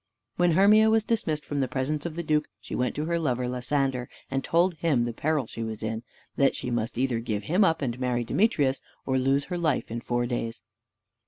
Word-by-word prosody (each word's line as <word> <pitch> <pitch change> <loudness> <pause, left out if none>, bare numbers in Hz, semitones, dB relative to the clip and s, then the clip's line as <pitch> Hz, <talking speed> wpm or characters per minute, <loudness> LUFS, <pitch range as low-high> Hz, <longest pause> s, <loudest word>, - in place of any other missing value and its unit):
When 175 -1 +3
Hermia 210 +5 +6
was 220 -1 +3
dismissed 160 -10 -1
from 145 - -2
the 135 - +1
presence 140 +5 -2
of 160 - -7
the 170 - -3
duke, 150 -1 +1
she 110 - -9
went 125 0 0
to 150 - -2
her 170 +1 0
lover 125 -5 0
Lysander, 125 0 -1 0.2
and 135 0 -1
told 175 +2 +3
him 150 -7 +1
the 120 - -3
peril 150 +2 0
she 115 - -7
was 110 -1 -4
in, 110 - -1
and 110 +1 -6 0.3
that 140 -1 +3
she 125 - -4
must 115 -1 -2
either 125 -2 +1
give 110 -3 -3
him 180 - +3
up 165 -5 +2
and 120 -1 -2
marry 125 -2 0
Demetrius, 145 - +2 0.2
or 130 -1 +1
lose 135 +2 +2
her 180 +3 -4
life 155 -9 0
in 115 +1 -3
four 120 0 0
days. 115 -3 -3
135 Hz, 225 wpm, -27 LUFS, 120-160 Hz, 0.3 s, Hermia